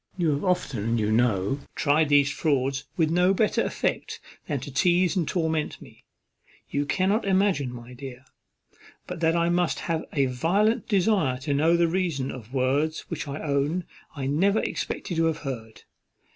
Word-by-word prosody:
You 170 -4 +2
have 145 0 -1
often, 120 - 0
you 105 -1 0
know, 110 +1 +1 0.2
tried 150 +1 +2
these 145 -1 +4
frauds 135 -3 0
with 160 -2 +2
no 180 +3 +3
better 215 +1 +2
effect - - -2 0.3
than 145 -4 -1
to 145 - -7
teize 175 +6 +2
and 170 -5 0
torment 160 -3 -1
me. - - -16 0.7
You 145 0 -1
cannot 195 +7 +1
imagine, 190 -9 +1
my 120 0 -10
dear, 130 0 -9 0.8
but 180 -2 -6
that 165 0 +2
I 170 0 +2
must 175 0 +1
have 165 -1 -2
a 140 -3 +2
violent 180 - +1
desire 190 - +2
to 145 +1 -1
know 160 +4 +3
the 170 0 +3
reason 165 -7 -1
of 120 -2 -10
words 140 +4 0
which 155 -2 -4
I 140 +2 -5
own 145 +4 0 0.3
I 135 -2 -4
never 185 +10 +2
expected 175 - -3
to 165 - +3
have 160 -1 +1
heard. 110 -5 -6
155 Hz, 170 wpm, -26 LUFS, 135-175 Hz, 0.8 s, these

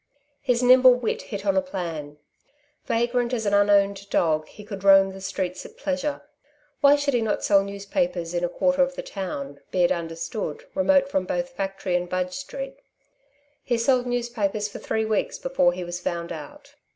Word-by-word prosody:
His 250 -2 +1
nimble 255 0 +7
wit 245 -3 -2
hit 200 -2 -7
on 195 -1 +2
a 190 - +4
plan. 165 -6 -5 0.7
Vagrant 240 +1 0
as 225 -3 -1
an 205 - +1
unowned 200 -1 +3
dog, 155 -2 +1
he 210 - -13
could 200 -2 -8
roam 195 -1 +6
the 195 - -10
streets 185 -1 -3
at - - -13
pleasure. 285 +1 -2 0.6
Why 285 0 +6
should 285 -1 0
he 240 - +2
not 220 -2 -1
sell 200 -1 +4
newspapers 200 - -2
in 175 0 -1
a 175 - +1
quarter 275 +8 +1
of 270 0 +1
the - - -5
town, 140 -8 -5
be 180 - +1
it 175 - +3
understood, 170 - -4
remote 280 -1 +3
from 190 -9 -1
both 265 +7 -2
factory 195 -6 -3
and 180 0 -1
Budge 185 0 -2
Street? - - -6 0.9
He 240 - 0
sold 250 +1 +2
newspapers 230 -4 -1
for 210 - -9
three 220 0 -1
weeks 220 -2 -1
before 265 -10 +2
he 180 +1 -5
was 175 0 -5
found 170 -1 -3
out. 150 -3 -9
200 Hz, 185 wpm, -25 LUFS, 180-250 Hz, 0.9 s, nimble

